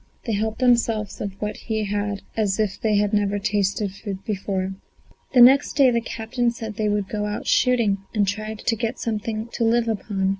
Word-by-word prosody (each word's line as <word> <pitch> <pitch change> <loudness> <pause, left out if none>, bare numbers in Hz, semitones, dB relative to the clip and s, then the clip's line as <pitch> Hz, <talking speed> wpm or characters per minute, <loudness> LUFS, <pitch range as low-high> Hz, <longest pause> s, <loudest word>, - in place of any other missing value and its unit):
They 230 - -1
helped 220 +2 -1
themselves 230 -5 +1
of 195 -1 -5
what 210 0 -3
he 220 -2 -2
had 205 0 -2
as 210 -2 0
if 210 -3 -1
they 215 -2 +2
had 205 0 +1
never 205 -1 +1
tasted 200 0 0
food 195 -1 -7
before. 195 -2 -2 0.6
The 250 - +8
next 265 +4 +7
day 270 -3 +5
the 235 -1 +1
captain 235 +2 -2
said 225 -2 -5
they 210 0 -1
would 205 0 +1
have 195 - -19
to 215 - -2
go 210 - -1
out 210 - -4
shooting 235 -6 +3
and 205 -3 +1
try 215 +2 -3
to 225 +1 -1
get 230 +2 -3
something 220 0 -3
to 235 - -1
live 230 +1 +2
upon. 200 -3 -1
215 Hz, 210 wpm, -23 LUFS, 205-230 Hz, 0.6 s, The